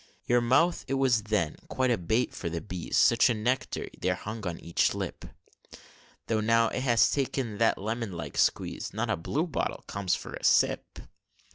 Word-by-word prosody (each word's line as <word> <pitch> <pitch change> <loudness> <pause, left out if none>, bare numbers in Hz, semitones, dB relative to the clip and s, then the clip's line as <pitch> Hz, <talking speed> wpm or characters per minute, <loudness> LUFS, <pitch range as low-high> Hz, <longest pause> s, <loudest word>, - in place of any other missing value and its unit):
Your 120 0 +3
mouth, 130 +9 +3
it 135 - -1
was 130 -4 +3
then 105 -7 -1
quite 130 -1 0
a 120 - +2
bait 110 +8 0
for 85 - -4
the 85 0 -3
bees, 90 -2 -4
Such 115 +2 +5
a 120 - +1
nectar 125 +5 -1
there 90 0 0
hung 110 +1 -6
on 85 -1 -3
each 85 - +1
lip; - - -5 1.0
Though 110 -1 0
now 115 +1 +3
it - - -3
has 120 -3 +4
taken 130 -6 -2
that 115 - +3
lemon 110 +1 -3
like 85 -3 -6
squeeze, - - 0
Not 110 +1 -1
a - - +2
blue 135 - -2
bottle 165 - -3
comes 100 -3 -1
for - - -8
a - - -8
sip! - - +2
115 Hz, 185 wpm, -28 LUFS, 100-125 Hz, 1.0 s, Such